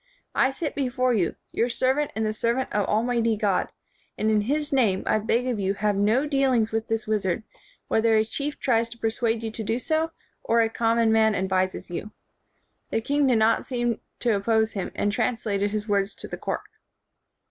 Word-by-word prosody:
I 265 Hz, -, +3 dB
sit 290 Hz, +3 st, -4 dB
before 255 Hz, -2 st, 0 dB
you, 185 Hz, -7 st, 0 dB, 0.2 s
your 235 Hz, -, 0 dB
servant 265 Hz, +4 st, +1 dB
and 220 Hz, 0 st, 0 dB
the 215 Hz, -, 0 dB
servant 235 Hz, +4 st, -1 dB
of 205 Hz, -1 st, +1 dB
Almighty 230 Hz, 0 st, +1 dB
God, 205 Hz, -3 st, +1 dB, 0.5 s
and 215 Hz, +1 st, +1 dB
in 215 Hz, -1 st, +3 dB
his 295 Hz, +6 st, -1 dB
name 220 Hz, -8 st, +2 dB
I 215 Hz, -, +2 dB
beg 230 Hz, +3 st, 0 dB
of 240 Hz, -4 st, -1 dB
you 195 Hz, 0 st, 0 dB
have 205 Hz, 0 st, 0 dB
no 215 Hz, +8 st, +2 dB
dealings 265 Hz, -6 st, +2 dB
with 225 Hz, 0 st, -2 dB
this 225 Hz, -1 st, -1 dB
wizard, 210 Hz, -1 st, -1 dB, 0.4 s
whether 225 Hz, 0 st, +3 dB
a 215 Hz, -, +3 dB
chief 285 Hz, +6 st, -4 dB
tries 230 Hz, -2 st, +1 dB
to 235 Hz, -, -10 dB
per 225 Hz, -1 st, 0 dB
suade 230 Hz, -1 st, -1 dB
you 225 Hz, -, -3 dB
to 220 Hz, -, -5 dB
do 225 Hz, +3 st, 0 dB
so, 315 Hz, +5 st, 0 dB, 0.3 s
or 230 Hz, 0 st, +3 dB
a 225 Hz, -, +2 dB
common 230 Hz, 0 st, +2 dB
man 220 Hz, -1 st, +4 dB
ad 190 Hz, 0 st, -1 dB
vises 185 Hz, -1 st, -1 dB
you." 185 Hz, +4 st, -4 dB, 0.8 s
The -, -, 0 dB
king 285 Hz, +4 st, +1 dB
did 250 Hz, -3 st, +4 dB
not 220 Hz, +1 st, +3 dB
seem 240 Hz, -3 st, -1 dB, 0.2 s
to 235 Hz, -2 st, +2 dB
op 200 Hz, 0 st, -3 dB
pose 220 Hz, -1 st, +2 dB
him, 195 Hz, -3 st, -3 dB
and 205 Hz, -, 0 dB
translated 215 Hz, -3 st, 0 dB
his 210 Hz, +1 st, -3 dB
words 200 Hz, -1 st, 0 dB
to -, -, -8 dB
the -, -, -5 dB
court. -, -, -3 dB
225 Hz, 205 wpm, -25 LUFS, 210-245 Hz, 0.8 s, man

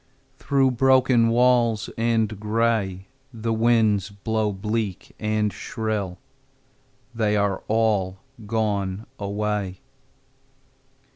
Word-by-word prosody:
Through 135 Hz, -2 st, +2 dB
broken 130 Hz, -2 st, +4 dB
walls 120 Hz, -2 st, +3 dB
and 110 Hz, -2 st, 0 dB
gray 105 Hz, -3 st, 0 dB, 0.3 s
The 115 Hz, -1 st, -2 dB
winds 110 Hz, -3 st, +2 dB
blow 105 Hz, +1 st, -1 dB
bleak 105 Hz, 0 st, -3 dB
and 105 Hz, -2 st, 0 dB
shrill: 105 Hz, -2 st, -3 dB, 1.0 s
They 105 Hz, -2 st, +1 dB
are 100 Hz, -2 st, 0 dB
all 105 Hz, -4 st, +1 dB, 0.3 s
gone 105 Hz, -2 st, -1 dB
away. 100 Hz, -2 st, -2 dB
110 Hz, 85 wpm, -24 LUFS, 100-115 Hz, 1.0 s, broken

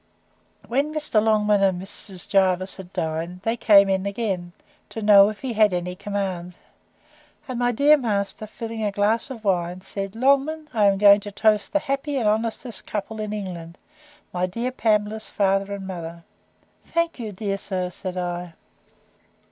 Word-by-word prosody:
When 280 Hz, +5 st, 0 dB
Mr. 300 Hz, -8 st, +1 dB
Longman 210 Hz, -2 st, +3 dB
and 190 Hz, -2 st, +2 dB
Mrs. 190 Hz, 0 st, -6 dB
Jervis 185 Hz, -1 st, +2 dB
had 185 Hz, -2 st, -10 dB
dined, 165 Hz, +2 st, -3 dB
they 225 Hz, +1 st, 0 dB
came 200 Hz, -4 st, +6 dB
in 190 Hz, 0 st, 0 dB
again, 195 Hz, -4 st, -3 dB, 0.4 s
to -, -, -6 dB
know 205 Hz, -1 st, +7 dB
if 215 Hz, -, -8 dB
he 260 Hz, -3 st, -3 dB
had 210 Hz, -3 st, +4 dB
any 180 Hz, 0 st, -2 dB
commands; 190 Hz, -3 st, -4 dB, 0.9 s
and 255 Hz, -2 st, -4 dB
my 245 Hz, 0 st, +2 dB
dear 290 Hz, +6 st, +5 dB
master, 215 Hz, -4 st, -2 dB
filling 225 Hz, 0 st, -6 dB
a 205 Hz, -, 0 dB
glass 210 Hz, +5 st, +1 dB
of 235 Hz, -5 st, -8 dB
wine, 180 Hz, -2 st, 0 dB
said, 195 Hz, +1 st, -5 dB
Longman, 280 Hz, +5 st, +2 dB
I 215 Hz, -3 st, +3 dB
am 200 Hz, -1 st, +4 dB
going 200 Hz, 0 st, +7 dB
to 205 Hz, 0 st, -8 dB
toast 215 Hz, 0 st, +2 dB
the -, -, +3 dB
happiest 275 Hz, -1 st, -2 dB
and 215 Hz, -, +1 dB
honestest 225 Hz, +2 st, -3 dB
couple 215 Hz, +1 st, -4 dB
in 215 Hz, -1 st, -3 dB
England, 180 Hz, -5 st, -6 dB, 0.6 s
my 180 Hz, 0 st, 0 dB
dear 235 Hz, +7 st, -3 dB
Pamela's 215 Hz, -2 st, 0 dB
father 195 Hz, 0 st, +1 dB
and 200 Hz, -1 st, -5 dB
mother.—Thank 180 Hz, -, -6 dB
you, 220 Hz, -3 st, -4 dB
dear 195 Hz, 0 st, -3 dB
sir, 185 Hz, -2 st, -3 dB
said 185 Hz, 0 st, -6 dB
I. 175 Hz, -1 st, -4 dB
205 Hz, 165 wpm, -23 LUFS, 185-225 Hz, 0.9 s, know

